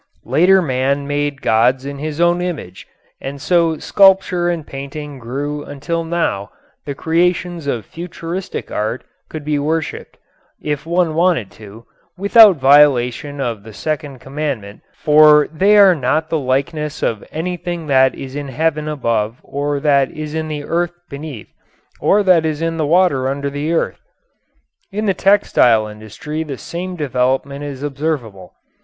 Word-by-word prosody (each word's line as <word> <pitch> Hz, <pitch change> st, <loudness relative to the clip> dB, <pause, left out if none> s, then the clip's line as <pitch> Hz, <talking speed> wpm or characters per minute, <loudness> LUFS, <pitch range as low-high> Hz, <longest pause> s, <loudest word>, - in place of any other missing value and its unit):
Later 180 Hz, +9 st, +4 dB
man 140 Hz, 0 st, 0 dB
made 145 Hz, -1 st, -2 dB
gods 125 Hz, +4 st, +2 dB
in 140 Hz, 0 st, -6 dB
his 155 Hz, +1 st, -5 dB
own 175 Hz, +1 st, +3 dB
image, 155 Hz, -, -6 dB, 0.3 s
and 140 Hz, +1 st, -6 dB
so 165 Hz, +1 st, +2 dB
sculpture 190 Hz, -1 st, +3 dB
and 170 Hz, -3 st, -3 dB
painting 140 Hz, +1 st, -7 dB
grew 145 Hz, +5 st, -4 dB
until 160 Hz, +5 st, -4 dB
now 160 Hz, -13 st, -2 dB, 0.4 s
the 140 Hz, -, -3 dB
creations 175 Hz, 0 st, 0 dB
of 120 Hz, -7 st, -2 dB
futuristic 175 Hz, +2 st, -6 dB
art 110 Hz, +4 st, -2 dB, 0.3 s
could 155 Hz, -2 st, -7 dB
be 150 Hz, -1 st, 0 dB
worshiped 155 Hz, +2 st, -3 dB, 0.4 s
if 150 Hz, +1 st, -4 dB
one 170 Hz, -1 st, +1 dB
wanted 165 Hz, -, +1 dB
to 110 Hz, +2 st, -13 dB, 0.3 s
without 200 Hz, +1 st, +7 dB
violation 140 Hz, 0 st, +3 dB
of 120 Hz, -6 st, -3 dB
the 110 Hz, +1 st, -12 dB
second 145 Hz, +1 st, -4 dB
commandment, 135 Hz, -7 st, -5 dB
for 150 Hz, 0 st, +5 dB
they 200 Hz, +6 st, +4 dB
are 195 Hz, -2 st, +7 dB
not 155 Hz, +2 st, -1 dB
the 160 Hz, -, +1 dB
likeness 145 Hz, +3 st, -2 dB
of 110 Hz, -3 st, -1 dB
anything 175 Hz, 0 st, -4 dB
that 130 Hz, -2 st, +3 dB
is 135 Hz, 0 st, -8 dB
in 145 Hz, -1 st, -4 dB
heaven 155 Hz, +3 st, -1 dB
above 115 Hz, -6 st, -1 dB
or 145 Hz, +1 st, -2 dB
that 140 Hz, -2 st, +3 dB
is 155 Hz, -1 st, -7 dB
in 160 Hz, 0 st, -2 dB
the 150 Hz, -1 st, -4 dB
earth 175 Hz, +3 st, -1 dB, 0.2 s
beneath 140 Hz, -5 st, -8 dB, 0.5 s
or 205 Hz, +1 st, +3 dB
that 180 Hz, -4 st, +4 dB
is 155 Hz, -2 st, -2 dB
in 165 Hz, 0 st, -2 dB
the 155 Hz, -2 st, 0 dB
water 160 Hz, -6 st, +3 dB
under 140 Hz, +1 st, -2 dB
the 145 Hz, +3 st, -3 dB
earth. 170 Hz, -, -1 dB, 0.9 s
In 210 Hz, +2 st, -2 dB
the 195 Hz, -, +2 dB
textile 125 Hz, -, +3 dB
industry 110 Hz, +9 st, -7 dB
the 145 Hz, -4 st, -5 dB
same 180 Hz, +6 st, -6 dB
development 135 Hz, -1 st, -1 dB
is 140 Hz, -1 st, -6 dB
observable. 135 Hz, -, -4 dB
150 Hz, 150 wpm, -18 LUFS, 135-165 Hz, 0.9 s, without